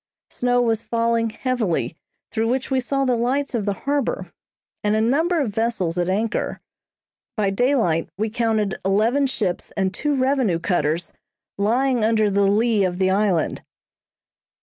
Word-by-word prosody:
Snow 245 0 +1
was 225 -2 +1
falling 230 0 0
heavily 225 -8 -1 0.4
through 225 +1 0
which 260 +2 -1
we 265 - +3
saw 275 +2 0
the 250 -2 +2
lights 260 +5 0
of 215 -4 -1
the 200 - +2
harbor, 290 - -1 0.5
and 210 0 +2
a - - +2
number 320 +10 +2
of 245 -9 -1
vessels 220 -7 0
at 175 0 0
anchor. 210 +4 -1 0.8
By 200 -2 +1
daylight 195 - +1
we 215 +1 -1
counted 220 -3 0
eleven 225 +9 +2
ships 200 -9 -2
and 190 -1 0
two 295 +7 -1
revenue 260 -8 +1
cutters 170 -1 -1 0.4
lying 240 +4 +1
under 215 -2 +2
the 200 0 +3
lee 215 +1 +2
of 180 -1 -1
the 190 0 +2
island. 195 -4 +1
225 Hz, 150 wpm, -22 LUFS, 195-250 Hz, 0.8 s, we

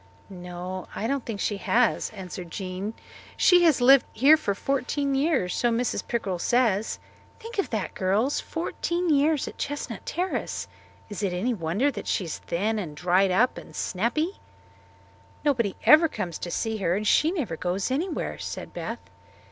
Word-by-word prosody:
"No, 180 0 -6
I 215 - -3
don't 275 +1 -1
think 220 -3 -4
she 205 - -1
has," 240 +4 +2
answered 185 -4 -8
Jean. 190 +4 -5 0.4
"She 360 -1 +6
has 315 -6 +4
lived 270 +2 +7
here 275 +7 +7
for 200 -10 -2
fourteen 275 +4 -1
years, 270 - +1
so 240 - +2
Mrs. 235 +1 -1
Pickrell 195 -7 -2
says. 225 -4 +2 0.4
Think 455 -1 -7
of 395 - 0
that, 215 -4 -3
girls! 205 +9 +1
Fourteen 345 +1 -2
years 295 0 +3
at - - -9
Chestnut 285 -6 -4
Terrace! 365 +3 -2 0.4
Is 205 -2 -6
it 195 -3 0
any 215 +8 0
wonder 200 - 0
that - - -7
she 195 - 0
is 165 - -5
thin 210 +6 -1
and 155 -7 -6
dried 180 +3 +3
up 225 +8 +2
and - - -13
snappy?" 275 - -1 1.1
"Nobody 235 -9 +1
ever 315 +2 +7
comes 185 - -5
to 175 - -5
see 220 +5 -2
her 180 -3 +1
and 210 +2 -2
she 310 - +4
never 300 - -2
goes 185 +7 -2
anywhere," 325 +6 -2
said - - -6
Beth. - - -6
225 Hz, 165 wpm, -26 LUFS, 185-280 Hz, 1.1 s, lived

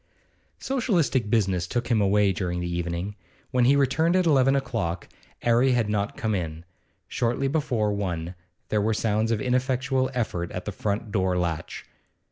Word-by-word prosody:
Socialistic 175 - 0
business 95 -6 +1
took 120 +6 -2
him 115 -4 +3
away 100 0 +3
during 90 0 -2
the 90 - -2
evening. 85 +3 -3 0.4
When 125 -2 +3
he 135 +3 +5
returned 150 +5 +2
at 185 -1 +3
eleven 135 -3 +4
o'clock, 95 -10 -2 0.4
'Arry 120 +2 +4
had 115 -4 +1
not 105 0 -1
yet - - -22
come 110 -1 -1
in. 85 -3 -4 0.4
Shortly 120 +3 0
before 125 -8 0
one 90 -4 -3 0.4
there 105 - +1
were 110 +1 +1
sounds 110 0 +1
of 115 -2 +1
ineffectual 130 +1 0
effort 90 -8 -2
at 90 - -5
the 105 - -3
front 105 +2 -3
door 95 -3 +1
latch. 85 -2 -3
110 Hz, 165 wpm, -25 LUFS, 95-130 Hz, 0.4 s, he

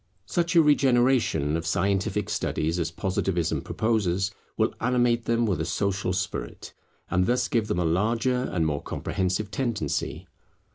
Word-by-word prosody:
Such 170 +8 -1
a 165 - +7
regeneration 125 - +3
of 80 0 -3
scientific 100 +3 0
studies 85 -4 -1
as 85 -1 -1
Positivism 90 -1 -1
proposes, 100 -4 0 0.3
will - - +1
animate 120 -1 +2
them 115 0 +2
with 95 -7 0
a - - -1
social 95 +2 -1
spirit, 90 -10 -4 0.4
and 90 +1 +2
thus 125 +1 +1
give 115 -3 0
them 105 - -1
a 90 - +1
larger 115 +9 +1
and 85 -3 0
more 75 -2 -1
comprehensive 95 +2 -2
tendency. 105 - -2
100 Hz, 145 wpm, -26 LUFS, 85-120 Hz, 0.4 s, a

